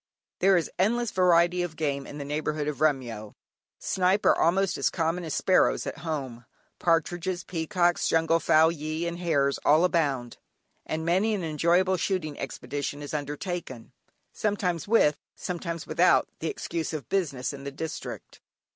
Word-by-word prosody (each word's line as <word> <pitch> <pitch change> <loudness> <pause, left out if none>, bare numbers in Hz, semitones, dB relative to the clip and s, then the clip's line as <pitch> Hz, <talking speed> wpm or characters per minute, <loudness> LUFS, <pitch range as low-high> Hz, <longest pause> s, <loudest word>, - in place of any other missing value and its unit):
There 190 0 +5
is 165 - -2
endless 235 +4 +1
variety 180 -1 +3
of 175 -3 -4
game 140 -3 -2
in 145 - -8
the 140 - -5
neighbourhood 150 0 -2
of 150 -1 -4
Remyo. 120 -8 -1 0.4
Snipe 190 +2 +1
are - - +6
almost 190 +2 +2
as 130 -3 +2
common 165 +5 -1
as 160 -3 -3
sparrows 185 - +3
at - - -5
home; 135 -7 -5 0.3
partridges, 175 +2 0
peacocks, 175 0 0
jungle 165 0 +2
fowl, 160 0 +4
gyee, 155 +1 -4
and 170 0 -4
hares 140 -6 +1
all 155 +3 +5
abound, 140 -9 -1 0.5
and 160 0 -3
many 190 +6 +2
an 190 - -4
enjoyable 170 +4 +2
shooting 170 -6 -2
expedition 145 +2 -5
is 145 - -7
undertaken, 145 - -5 0.4
sometimes 190 -6 -1
with, 150 -10 +4 0.2
sometimes 170 -2 -5
without 180 +1 +3
the 165 - -3
excuse 165 -1 -4
of 145 -7 -5
"business" 145 -10 -1
in 140 -1 -9
the 140 - -4
district. 155 +3 -7
165 Hz, 155 wpm, -27 LUFS, 145-180 Hz, 0.5 s, are